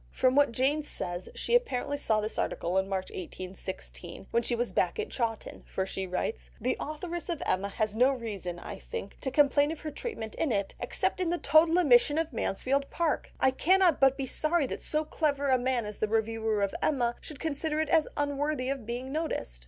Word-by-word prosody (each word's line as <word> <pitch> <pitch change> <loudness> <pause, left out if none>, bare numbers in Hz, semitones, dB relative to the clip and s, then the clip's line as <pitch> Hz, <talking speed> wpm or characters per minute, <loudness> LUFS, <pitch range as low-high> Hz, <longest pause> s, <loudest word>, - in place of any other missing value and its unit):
From 255 - +2
what 285 -2 +4
Jane 270 +6 +1
says 175 -11 -4
she - - -1
apparently 285 - +2
saw 220 -7 +1
this 215 +1 -3
article 175 +2 -1
in 190 0 -2
March 190 -1 -2
1816 185 0 -7
when 235 - +3
she 240 +1 0
was 240 +1 -1
back - - +1
at 435 - -3
Chawton; 230 -3 -3
for 190 - -2
she 190 0 -4
writes: 60 - -3
"The - - 0
authoress 335 +4 -5
of 335 -3 -2
Emma 195 +2 0
has 215 +1 -1
no 250 +4 +5
reason, 205 -9 -4
I - - -8
think, 470 - -7
to 265 - -1
complain 290 +1 +4
of 320 - -6
her 305 - -4
treatment 280 - -5
in 315 - 0
it, 200 -3 0
except - - -1
in 355 - +1
the 350 - +1
total 325 +1 +5
omission 290 -2 +5
of 325 -3 -1
Mansfield 275 +6 0
Park; 330 -2 -1
I 265 - +4
cannot 360 +4 +4
but 270 0 +5
be 270 - -2
sorry 310 +4 +1
that - - -5
so 310 0 0
clever 285 -2 0
a 260 -1 +4
man 245 -2 0
as 210 -1 -7
the 215 - +1
reviewer 220 -1 0
of 200 - 0
Emma 245 -6 +2
should 300 - -10
consider 310 0 -1
it 315 - 0
as 320 -2 +4
unworthy 290 -2 0
of 270 -5 -3
being 245 +3 -4
noticed." 300 - -2
265 Hz, 205 wpm, -29 LUFS, 215-305 Hz, -, no